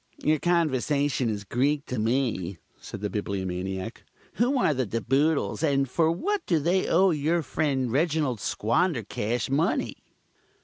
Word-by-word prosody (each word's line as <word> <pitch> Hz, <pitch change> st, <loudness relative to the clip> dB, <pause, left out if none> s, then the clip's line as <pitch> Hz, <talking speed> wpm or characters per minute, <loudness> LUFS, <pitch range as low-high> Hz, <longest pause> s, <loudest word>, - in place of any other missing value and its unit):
"Your 155 Hz, 0 st, +2 dB
conversation 145 Hz, -6 st, +1 dB
is 105 Hz, -2 st, -3 dB
Greek 140 Hz, +7 st, 0 dB
to 125 Hz, -, -3 dB
me," 110 Hz, -6 st, 0 dB, 0.2 s
said -, -, -8 dB
the 105 Hz, -, -2 dB
Bibliomaniac. 95 Hz, 0 st, -4 dB, 0.3 s
"Who 250 Hz, +4 st, +2 dB
are 195 Hz, -11 st, +3 dB
the 130 Hz, -3 st, -1 dB
De 115 Hz, +4 st, -2 dB
Boodles, 140 Hz, +8 st, +1 dB
and 140 Hz, -3 st, +2 dB
for 160 Hz, +5 st, +2 dB
what 405 Hz, -, -1 dB
do 170 Hz, -, +3 dB
they 175 Hz, +5 st, +1 dB
owe 185 Hz, +2 st, +4 dB
your 160 Hz, +2 st, 0 dB
friend 130 Hz, -3 st, -1 dB
Reginald 145 Hz, -3 st, +1 dB
Squandercash 120 Hz, -, -1 dB
money?" 160 Hz, +8 st, 0 dB
140 Hz, 140 wpm, -26 LUFS, 115-160 Hz, 0.3 s, owe